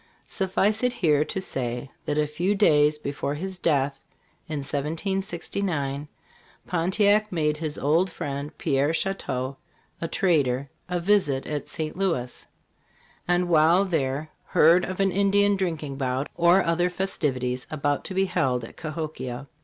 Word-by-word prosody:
Suffice 200 +2 0
it 250 -1 +1
here 150 -7 +3
to 190 - -3
say, 125 -6 -3
that 145 - -1
a 150 - +3
few 175 +7 0
days 150 -6 +4
before 145 -1 -3
his 185 +3 -5
death, 140 -4 +1 0.5
in 150 -2 -2
1769, 160 -1 -2 0.6
Pontiac 205 +5 +2
made 155 -3 0
his 155 -1 -3
old 165 +6 +2
friend, 140 -2 -5
Pierre 145 0 +1
Chouteau, 140 -8 -2 0.4
the 165 - -2
trader, 140 -8 +1 0.2
a 180 0 0
visit 170 -8 +2
at 150 -1 -4
St. 155 -2 -4
Louis; 165 -11 -2 0.8
and 175 0 +2
while 170 +3 +5
there 155 -3 -1
heard 170 +3 +5
of 185 +1 -5
an 195 -1 +3
Ind 200 +1 +1
ian 205 0 +4
drinking 160 -7 -3
bout 130 +1 -1
or 175 +3 +5
other 175 +2 +1
festivities 130 -9 -2
about 145 -1 -1
to 190 - -5
be 190 0 +3
held 130 -9 0
at 115 - -10
Cahokia. 155 -5 -5
155 Hz, 145 wpm, -25 LUFS, 140-185 Hz, 0.8 s, while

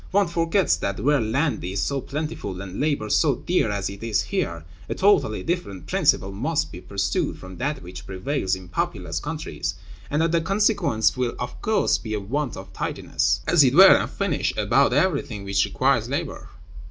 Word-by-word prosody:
One 200 +1 +3
forgets 170 +3 +1
that, 100 -1 -3
where 145 -1 +2
land 120 - 0
is 95 +3 -3
so 140 +6 -1
plentiful 150 - -5
and 95 -1 -7
labor 145 -7 0
so 140 +5 +3
dear 175 -8 0
as 100 -2 -2
it 100 0 -8
is 115 -2 0
here, 85 - -3 0.2
a - - -2
totally 185 - +2
different 135 - -3
principle 95 - +2
must 145 +11 -1
be 90 - -9
pursued 100 -1 -1
from 95 -1 -11
that 140 -1 -2
which 90 +1 -10
prevails 95 +1 -1
in 95 -1 -11
populous 85 - -2
countries, - - -4 0.3
and 150 +3 +1
that 165 - +1
the 170 -1 +2
consequence 195 - +2
will 125 -2 -1
of 125 - -6
course 220 -1 +2
be 110 -1 -4
a - - -1
want 130 +6 -3
of - - -10
tidiness, 95 +4 -1
as 165 -2 +5
it 130 0 +3
were, 190 +2 +10
and - - 0
finish, 195 -7 -1
about 115 +7 +3
everything 140 - 0
which 100 0 +1
requires - - +1
labor." - - -4
125 Hz, 185 wpm, -24 LUFS, 100-165 Hz, 0.3 s, were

